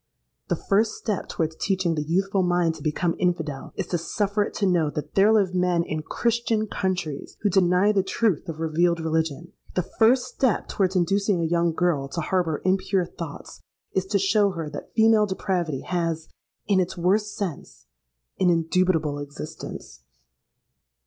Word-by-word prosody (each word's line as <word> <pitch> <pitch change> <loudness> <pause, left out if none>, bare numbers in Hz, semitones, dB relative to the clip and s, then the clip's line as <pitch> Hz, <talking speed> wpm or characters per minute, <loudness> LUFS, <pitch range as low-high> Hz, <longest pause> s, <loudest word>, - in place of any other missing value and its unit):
The - - +1
first 215 +2 +1
step 210 -5 -3
towards 160 -1 -2
teaching 190 -4 0
the 155 - -1
youthful 190 +5 +1
mind 175 -2 +2
to - - -12
become 165 +2 0
infidel, 160 -6 -1
is - - -2
to 175 - 0
suffer 205 +4 -1
it 205 - -2
to 205 - 0
know 175 -5 +2
that 150 0 -6
there 200 +2 +5
live 200 -4 +3
men, 180 -2 +2
in 155 -1 -3
Christian 230 +4 0
countries, 185 -8 -3
who 205 - +1
deny 185 +2 +4
the 200 -2 +2
truth 190 -2 0
of 160 -1 -5
revealed 165 +2 +1
religion:—the 160 +2 -2 0.2
first 245 +3 +5
step 255 -2 0
towards 190 -1 0
inducing 195 +2 +2
a - - 0
young 170 +1 +2
girl 160 -5 0
to 170 +5 -4
harbour 165 -2 -1
impure 190 0 +1
thoughts, 165 -3 -9 0.3
is 190 0 -1
to 200 - +1
show 200 +1 +3
her 165 -3 -5
that - - -8
female 220 -1 +5
depravity 175 -7 -2
has, 165 -3 -2 0.4
in 200 -2 +3
its 185 0 -1
worst 205 +4 +1
sense, 185 -8 -5 0.5
an 185 - +4
indubitable 165 -3 +1
existence! 145 - -8
180 Hz, 160 wpm, -25 LUFS, 160-195 Hz, 0.5 s, there